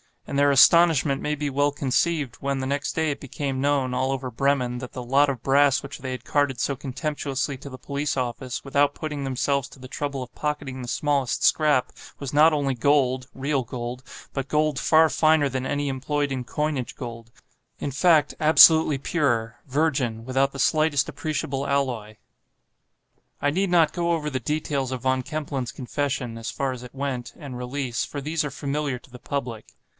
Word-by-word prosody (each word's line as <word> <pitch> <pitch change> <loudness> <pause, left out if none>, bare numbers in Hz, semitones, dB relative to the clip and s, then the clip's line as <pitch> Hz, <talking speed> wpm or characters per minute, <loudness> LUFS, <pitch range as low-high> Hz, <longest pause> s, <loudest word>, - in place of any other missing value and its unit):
And 140 - -2
their 145 0 +5
astonishment 150 0 +5
may 150 - -1
be 145 0 -2
well 145 +1 +1
conceived, 145 0 0
when 140 0 -2
the 130 - -2
next 140 +1 -2
day 160 -2 0
it 140 - -5
became 135 0 -4
known, 140 -3 +1
all 130 +1 0
over 130 -1 -3
Bremen, 125 -1 0
that 125 0 -8
the 125 - -5
"lot 140 +4 +3
of 130 -4 -4
brass" 140 +1 +4
which 140 +1 -8
they 130 0 -5
had 130 - -5
carted 145 -4 0
so 140 - 0
contemptuously 140 0 -3
to 140 - -10
the 130 - -9
police 140 +2 -3
office, 125 0 -3
without 140 +1 +2
putting 150 -3 -4
themselves 140 +1 0
to - - -15
the 130 0 -10
trouble 140 -2 -3
of 125 0 -13
pocketing 145 -3 -3
the 125 - -7
smallest 140 -1 0
scrap, 150 -5 +3 0.3
was 140 -2 -6
not 155 +2 +6
only 140 -3 0
gold—real 135 +1 +1
gold—but 125 +3 -6
gold 150 -2 +1
far 160 0 +5
finer 155 0 +3
than 130 0 -3
any 145 +1 -1
employed 140 +2 -1
in 130 -2 -3
coinage—gold, 125 -5 -4 0.5
in 140 - -3
fact, 150 +1 +3
absolutely 160 -1 +7
pure, 120 -6 0
virgin, 130 -5 0
without 135 +2 +1
the 135 - -7
slightest 155 0 +2
appreciable 140 -3 -3
alloy. 125 -7 -1 1.3
I 145 - +2
need 190 +5 0
not 165 -3 +4
go 170 -1 0
over 150 -2 -1
the 130 -3 -2
details 140 -1 -2
of 130 -2 -4
Von 130 0 +1
Kempelen's 140 -4 -4
confession 125 -2 -3
(as 115 - -5
far 135 -1 -2
as 125 -1 -7
it 125 +2 -12
went) 130 -4 -4
and 140 -5 -8
release, 125 -1 -3
for 145 - -6
these 155 +2 -1
are 145 - -4
familiar 140 -1 -2
to 125 - -19
the 125 - -11
public. 120 -6 -5
140 Hz, 180 wpm, -24 LUFS, 130-145 Hz, 1.3 s, absolutely